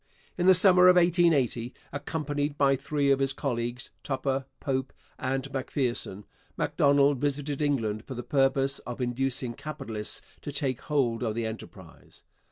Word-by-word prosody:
In 180 0 0
the 190 - +8
summer 180 0 +6
of 180 - +7
1880, 165 -9 +2 0.2
accompanied 145 -1 -3
by 140 -1 +4
three 140 +1 0
of 135 - +3
his 135 0 +1
colleagues 120 -1 -3
Tupper, 135 0 -1
Pope, 130 -2 -2 0.3
and 135 +1 -2
Macpherson 125 -7 -2 0.3
Macdonald 140 -1 +3
visited 145 +1 -2
England 115 -7 0
for 130 - -7
the 125 - -5
purpose 135 0 +1
of 120 0 -7
inducing 125 0 -1
capitalists 115 -7 -5 0.2
to 145 - -5
take 135 -3 -2
hold 130 -6 0
of 110 -3 -1
the 115 -1 -1
enterprise. 110 0 -10
135 Hz, 145 wpm, -28 LUFS, 125-145 Hz, 0.3 s, the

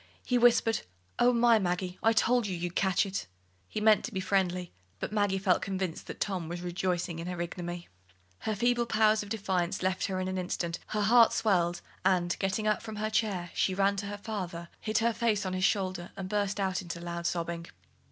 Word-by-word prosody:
He 250 -1 +2
whispered: 235 -1 +4 0.4
"Oh, 245 +1 +6
my! 235 -2 +5
Maggie, 180 -1 -2
I 225 - +4
told 230 0 +3
you 185 -3 -3
you'd 175 0 -4
catch 190 +1 +2
it." 195 0 -4 0.4
He - - -4
meant 215 -1 +5
to 245 - -6
be 190 - -2
friendly, 185 -2 0 0.3
but - - -4
Maggie 205 -2 +1
felt 190 -2 +2
convinced 190 -3 -3
that - - -7
Tom 185 -5 -2
was 175 0 -5
rejoicing 175 -1 -2
in 165 - -5
her 180 -1 -4
ignominy. 175 0 -5 0.5
Her 215 - -2
feeble 240 +2 +2
power 215 -1 +4
of 210 -2 -3
defiance 190 -4 -1
left 185 0 0
her 185 -1 -2
in 185 - -2
an 185 0 -2
instant, 175 -1 -3
her 210 - -1
heart 230 +2 +6
swelled, 175 -5 +1 0.2
and, 180 -2 +2
getting 195 +2 -1
up 215 -1 +2
from 220 -1 -7
her 215 +1 -2
chair, 200 -6 0
she 190 - +1
ran 200 +1 +3
to 200 +1 -3
her 205 0 -5
father, 180 -5 -5
hid 215 0 -1
her 230 0 +2
face 220 -3 +1
on 185 - -2
his 185 0 +1
shoulder, 185 -4 0
and 190 - -4
burst 205 0 -1
out 190 -2 0
into 170 -1 -6
loud 170 0 -3
sobbing. 170 -1 -3
190 Hz, 210 wpm, -30 LUFS, 180-215 Hz, 0.5 s, Oh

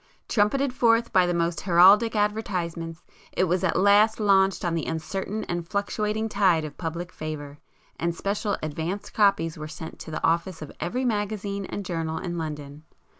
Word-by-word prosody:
Trumpeted 250 +5 +1
forth 230 -2 +2
by 185 -1 +5
the 175 - 0
most 170 -2 0
heraldic 195 +5 +6
advertisements, 180 -6 -2 0.3
it - - +1
was 185 +1 +1
at 180 - +1
last 205 +3 +4
launched 195 -3 +3
on 170 - 0
the 165 -2 -2
uncertain 190 +6 -3
and 175 -2 -4
fluctuating 210 +2 -1
tide 185 -7 +2
of 150 - -8
public 170 +1 -5
favour, 145 -2 -7 0.4
and 170 0 -1
special 200 +3 -1
'advance' 160 +6 -4
copies 195 -7 +2
were 155 - -5
sent 160 +1 -9
to - - -9
the 155 - -5
office 170 0 0
of 150 - -9
every 250 +9 -2
magazine 205 -3 -2
and 200 - -5
journal 165 -2 -2
in 175 0 -4
London. 150 -2 -6
180 Hz, 170 wpm, -25 LUFS, 165-205 Hz, 0.4 s, heraldic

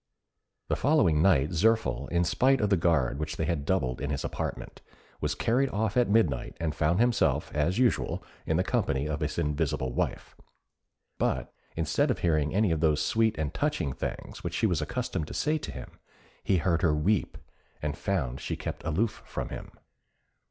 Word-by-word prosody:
The - - +1
following 130 - +3
night 80 -6 +4
Zirphil, 110 +6 +2
in 85 0 +2
spite 130 +9 +3
of 105 -1 0
the - - +6
guard 80 -6 +1
which 75 -1 -3
they 80 - 0
had 75 -3 -1
doubled 65 -9 0
in 70 - -2
his 70 -2 -2
apartment, - - -5 0.4
was 75 0 -1
carried 125 - +1
off 110 +1 -1
at 125 -3 +3
midnight, 85 - +1
and 80 -2 -1
found 85 +5 +1
himself, 120 0 +2
as 80 +6 +1
usual, 125 -1 +1 0.2
in 80 - +2
the 90 - +2
company 70 -3 0
of 75 -1 -2
his 75 -1 -3
invisible 75 -5 -1
wife; - - -3 0.8
but - - -1 0.2
instead 80 - +1
of 125 - +1
hearing 75 -3 +1
any 105 +1 +2
of 80 - +1
those 75 -2 +3
sweet 110 -5 +2
and 75 -2 -2
touching 90 - -1
things - - -6
which - - -3
she - - +1
was 90 -7 +1
accustomed 115 -1 -3
to - - -7
say 155 +1 +1
to - - -6
him, - - -8 0.5
he 95 - +2
heard 85 -1 +1
her 80 -3 +3
weep, 95 +6 0 0.4
and 75 -1 -2
found 70 -10 -2
she - - -3
kept - - -5
aloof 100 +8 -1
from - - -4
him. - - -7
85 Hz, 185 wpm, -28 LUFS, 75-110 Hz, 0.8 s, the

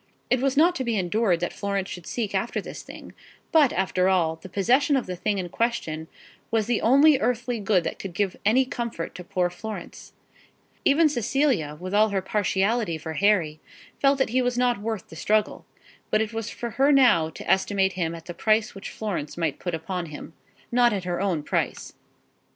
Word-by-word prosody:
It 255 - +3
was 275 0 0
not 340 +4 +5
to 260 - -2
be 235 -3 -1
endured 185 -1 +1
that 175 - -2
Florence 200 -2 -2
should 180 -3 -8
seek 220 -5 -3
after 195 +4 -1
this - - -8
thing; - - -11 0.4
but, 305 -6 +5
after 185 0 +1
all, 165 -4 +1
the 190 - -12
possession 245 +10 +2
of 255 - -2
the 185 - -5
thing 200 +3 -1
in 185 -2 -3
question 165 -9 -2 0.4
was 225 -2 +1
the 235 0 0
only 280 +4 +5
earthly 245 -2 -1
good 195 -3 +2
that - - -4
could 185 -3 -7
give 195 -1 0
any 240 +6 +4
comfort 235 -10 -4
to 180 - -9
poor 180 -1 -1
Florence. 200 -1 -8 0.7
Even 310 +3 +5
Cecilia, 240 - 0
with 185 +2 -6
all 215 +1 +4
her 195 -2 -1
partiality 200 -1 0
for 160 +1 -6
Harry, 170 -5 +2 0.4
felt 275 0 +4
that 265 - +1
he 255 +1 +2
was 245 -1 -1
not 245 -4 +1
worth 220 -3 -4
the - - -11
struggle; 210 +5 0 0.4
but 215 - +2
it 220 +1 -2
was 225 0 -3
for 235 -1 -5
her 280 +2 +6
now 245 - +5
to - - -10
estimate 190 0 +2
him 170 -2 -2
at 165 -1 -11
the 175 - -6
price 215 +5 +1
which 195 - -8
Florence 185 -10 -4
might 165 -4 -1
put 175 -2 -3
upon 175 +1 -4
him, 150 +1 -9 0.4
not 240 -1 +4
at 195 -3 -2
her 175 0 -2
own 180 -7 0
price. - - -2
205 Hz, 200 wpm, -25 LUFS, 180-240 Hz, 0.7 s, her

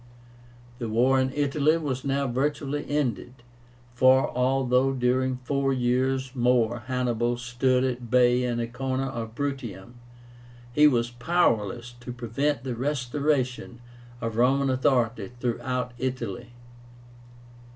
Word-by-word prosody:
The 115 - -3
war 125 +4 +3
in 130 0 +1
Italy 145 +2 +2
was 135 -5 -3
now 140 0 0
virtually 140 +3 -1
ended, 125 -3 -2 0.5
for, 130 +2 +4
although 130 +1 +2
during 130 0 +1
four 140 +1 0
years 130 +1 0
more 120 -2 +2
Hannibal 120 -2 0
stood 125 +1 +1
at 125 -2 -3
bay 125 0 +4
in 120 -1 -1
a 115 - 0
corner 130 +2 -3
of 115 -4 -6
Bruttium, 120 -6 -5 0.7
he 150 +3 +6
was 120 -4 +1
powerless 120 - 0
to 125 0 -7
prevent 125 +4 -2
the 130 -2 -3
restoration 130 -1 -1 0.4
of 115 -1 -3
Roman 135 +3 +3
authority 125 -2 +1
throughout 125 +1 -2
Italy. 120 -3 -4
125 Hz, 120 wpm, -26 LUFS, 120-135 Hz, 0.7 s, he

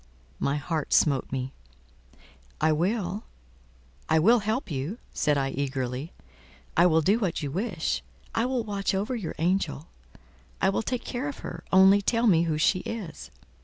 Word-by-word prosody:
My 140 - +1
heart 150 +1 -2
smote 140 -4 +3
me. 130 0 -3 1.1
"I 160 - +3
will—I 65 - -3
will 225 +10 +5
help 215 - -2
you," 145 - -3 0.2
said 150 -1 +2
I 135 -1 0
eagerly. 135 +1 -3 0.6
"I 175 - +6
will 160 -1 +4
do 200 +8 +3
what 185 -7 -1
you 140 - -3
wish. 175 - -1 0.3
I 230 +2 +1
will 255 -2 0
watch 200 -2 -1
over 210 +7 -1
your 205 -9 -4
angel; 165 -3 0 0.7
I 190 - +3
will 195 - 0
take 245 +2 -3
care 255 +3 -3
of 280 - -6
her, - - -6
only 190 +2 +7
tell 230 +3 +1
me 170 -6 +5
who 155 -2 0
she 185 +4 +3
is." 180 - -6
170 Hz, 160 wpm, -27 LUFS, 140-210 Hz, 1.1 s, only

